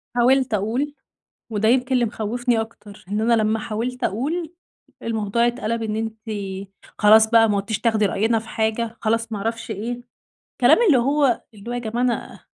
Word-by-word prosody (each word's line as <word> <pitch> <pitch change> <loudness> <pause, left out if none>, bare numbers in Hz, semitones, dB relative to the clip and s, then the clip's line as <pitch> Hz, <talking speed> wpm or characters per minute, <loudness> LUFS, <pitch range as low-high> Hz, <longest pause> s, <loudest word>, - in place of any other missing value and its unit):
حاولت 255 0 +3
أقول، 240 +9 -1 0.6
وده 215 +1 +1
يمكن 255 +1 +2
اللي 245 -1 +3
مخوّفني 230 +2 -1
أكتر، 215 -2 -9
إن 210 +2 -1
أنا 230 -1 +3
لمّا 215 +1 +1
حاولت 235 +4 -4
أقول 315 - -2 0.5
الموضوع 230 +1 0
اتقلب 230 -1 -2
إن 215 -1 -2
أنتِ 225 0 -4 0.8
خلاص 220 +1 +6
بقى 225 -2 +5
ما 205 - +1
عدتيش 210 +2 -2
تاخدي 220 -3 +2
رأينا 225 +4 +1
في 220 0 -10
حاجة، 225 +1 -1
خلاص 225 +1 0
ما 210 - -2
اعرفش 225 +2 -4
إيه، 220 +4 -3 0.6
الكلام - - +5
اللي 280 -7 +6
هو 275 0 +2
اللي 210 +3 -10
هو - - -3
يا 245 - -2
جماعة 235 +1 -2
أنا 245 -2 -2
225 Hz, 170 wpm, -22 LUFS, 215-245 Hz, 0.8 s, خلاص